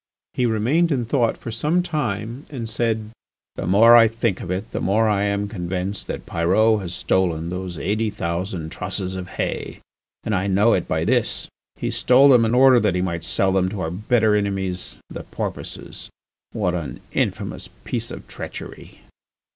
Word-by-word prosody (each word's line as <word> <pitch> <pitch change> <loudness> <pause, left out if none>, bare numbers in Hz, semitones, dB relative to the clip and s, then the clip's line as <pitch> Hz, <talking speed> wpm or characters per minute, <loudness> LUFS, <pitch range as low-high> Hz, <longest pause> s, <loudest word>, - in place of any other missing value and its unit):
He 125 - +1
remained 130 +10 +2
in 125 -4 0
thought 120 -1 +1
for 115 - -7
some 155 +10 +1
time 120 - -3
and 125 -6 -5
said: 110 -1 -1 0.4
"The - - -4
more 110 +6 +7
I 115 -1 +8
think 115 -3 -1
of 85 - -7
it 95 +3 -3
the - - -3
more 110 +3 +2
I 105 -1 +2
am 100 0 0
convinced 95 0 -4
that - - -5
Pyrot 105 +6 +2
has 90 -2 -5
stolen 85 -3 0
those 90 -1 -5
eighty 105 +8 0
thousand 85 -2 -3
trusses 95 0 -4
of 95 -1 -5
hay. - - -4 0.5
And 110 - -2
I 95 0 0
know 100 +4 +4
it - - 0
by - - 0
this: - - 0 0.3
he - - -3
stole 130 +3 +5
them 120 -4 +6
in 115 +2 +1
order 130 -1 +7
that 105 -5 +1
he 90 - +1
might 85 -3 -3
sell 95 +3 +1
them 95 -1 +2
to 100 -1 -5
our 80 - -2
bitter 110 +3 +2
enemies 95 -3 -2
the - - -7
Porpoises. - - -6 0.4
What 95 -5 -1
an 75 -8 -4
infamous - - -2
piece - - -3
of - - -9
treachery! - - -9
105 Hz, 180 wpm, -22 LUFS, 90-115 Hz, 0.5 s, I